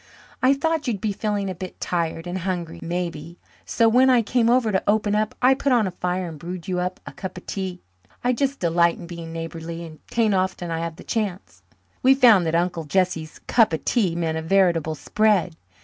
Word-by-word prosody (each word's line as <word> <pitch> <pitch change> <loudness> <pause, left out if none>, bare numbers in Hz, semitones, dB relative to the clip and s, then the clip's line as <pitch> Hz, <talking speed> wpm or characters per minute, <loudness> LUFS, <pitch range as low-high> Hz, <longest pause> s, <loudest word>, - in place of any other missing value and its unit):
"I 260 +2 +5
thought 320 +1 -1
you'd 220 -5 -1
be 210 +2 -1
feeling 205 -1 -2
a 190 - -3
bit 185 +1 -8
tired 165 -1 -2
and 180 +1 -3
hungry, 175 -2 -4
maybe, 170 -1 -4 0.3
so 230 - +3
when 250 +4 +5
I 245 -3 +4
came 230 +1 +2
over 240 -3 +3
to 190 - +1
open 210 0 +2
up 215 0 0
I 260 +1 +7
put 275 +1 -1
on 240 -4 +4
a 190 - -2
fire 180 +1 -2
and 160 -3 -8
brewed 175 +2 -7
you 180 -1 -1
up 180 0 -3
a - - -7
cup 190 -1 -7
of 180 - -10
tea. 185 -2 -4 0.4
I 250 +1 +2
just 275 +3 -1
delight 170 0 +2
in 175 - -9
being 170 -1 -8
neighbourly 165 +1 -6
and 155 -2 -12
'tain't 225 -3 +1
often 185 -2 -1
I 165 - -2
have 165 -1 -4
the - - -12
chance." 205 -5 -4 0.4
We 265 0 +6
found 225 -10 +6
that 160 - 0
Uncle 170 -1 0
Jesse's 165 -2 -1
"cup 225 -7 +3
of 160 - -3
tea" 195 -9 +1
meant 160 -2 -1
a - - -4
veritable 165 -3 +2
spread. 205 -1 +1
185 Hz, 215 wpm, -23 LUFS, 170-220 Hz, 0.4 s, I